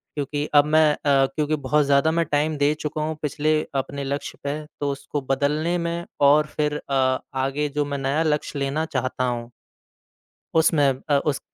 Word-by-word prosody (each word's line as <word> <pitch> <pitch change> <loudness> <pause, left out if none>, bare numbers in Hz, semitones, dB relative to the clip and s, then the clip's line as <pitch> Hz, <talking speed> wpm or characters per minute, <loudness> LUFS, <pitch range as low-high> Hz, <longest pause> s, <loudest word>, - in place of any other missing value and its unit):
क्योंकि 145 0 -2
अब 145 - +7
मैं 155 0 +4
अ, 140 -2 +2
क्योंकि 150 +3 -1
बहुत 145 +1 +1
ज़्यादा 140 +3 +3
मैं 165 +1 +1
टाइम 150 +1 0
दे 145 +1 +3
चुका 150 0 -3
हूँ 155 +1 -2
पिछले 155 +1 +1
अपने 140 +1 -2
लक्ष्य 140 +1 -4
पे 145 +2 -2 0.2
तो 145 -1 0
उसको 140 +1 -4
बदलने 150 +5 +1
में 170 0 -3 0.2
और 150 +1 +4
फ़िर 150 -1 0
अ, 130 -2 0 0.2
आगे 135 +3 -1
जो 145 +1 -1
मैं 145 0 -3
नया 140 +4 0
लक्ष्य 150 -2 -1
लेना 140 +3 -1
चाहता 130 -3 -2
हूँ 120 -1 -3 1.0
उसमें 160 -3 +4 0.2
अ, 145 -1 +4
उस 140 0 -1
145 Hz, 175 wpm, -23 LUFS, 140-155 Hz, 1.0 s, अब